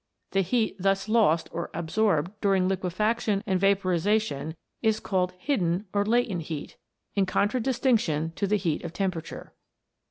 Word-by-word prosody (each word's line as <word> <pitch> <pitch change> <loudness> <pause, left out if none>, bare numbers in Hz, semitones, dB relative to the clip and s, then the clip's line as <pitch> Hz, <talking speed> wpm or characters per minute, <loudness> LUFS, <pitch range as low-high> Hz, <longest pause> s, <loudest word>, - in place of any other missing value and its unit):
The 195 - +2
heat 220 +4 0
thus 195 +2 +1
lost 215 -8 +3
or 170 - -4
ab 165 -1 -4
sorbed 185 -6 +2
during 195 -2 +3
liquefaction 200 +3 0
and 190 -3 +1
vaporization 190 -4 +1 0.3
is 220 -1 +2
called 185 -2 0
hidden 185 - 0
or 200 0 +2
latent 220 -4 +1
heat, 155 -3 -6 0.4
in 195 -2 +1
contradistinction 220 - +1
to 200 - -1
the 210 +2 +2
heat 170 -6 -1
of 170 -1 -6
temperature. 185 -5 -4
195 Hz, 140 wpm, -27 LUFS, 175-215 Hz, 0.4 s, lost